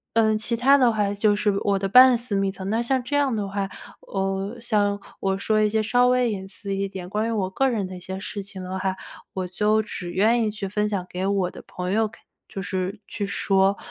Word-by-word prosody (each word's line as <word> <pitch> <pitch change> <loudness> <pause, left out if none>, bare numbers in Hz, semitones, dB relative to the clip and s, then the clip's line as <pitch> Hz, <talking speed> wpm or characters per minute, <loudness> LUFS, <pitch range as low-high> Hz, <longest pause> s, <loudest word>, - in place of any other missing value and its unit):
呃， 220 -1 +4
其 230 +2 -1
它 270 +4 +5
的 250 -3 +4
话 205 -2 0
就 205 +1 +3
是 205 -2 +1
我 200 -1 +1
的 195 - -1
半 250 +3 +8
私 235 -3 -4
密 195 0 +1
的， 190 -1 -8
那 220 +4 0
像 260 +2 +1
这 260 +4 -3
样 285 -3 +2
的 205 -2 -2
话， 195 0 -3 0.3
呃， 195 +3 -3
像 205 -3 +1 0.2
我 195 0 0
说 215 +2 +1
一 210 - +3
些 220 +1 +1
稍 245 +3 +3
微 250 -1 +3
隐 190 -2 -4
私 200 0 -5
一 195 0 -2
点 185 -2 -7
关 215 +3 -1
于 - - -1
我 195 -4 -1
个 270 +8 +1
人 215 -6 -1
的 185 - -8
一 - - -8
些 190 +1 -6
事 200 0 -5
情 195 -1 -8
的 185 +1 -4
话， 190 0 -1 0.4
我 185 -1 -3
就 210 +4 +2
只 180 -4 -6
愿 225 +5 +3
意 215 - 0
去 205 -2 -5
分 210 +2 0
享 190 -3 -2
给 185 +1 -3
我 195 -3 +1
的 - - -11
朋 180 0 -4
友 220 0 +2
看 - - -18 0.3
就 195 - -5
是 185 +2 -3
去 205 - -3
说， 195 0 +2
205 Hz, 265 characters per minute, -24 LUFS, 195-220 Hz, 0.4 s, 半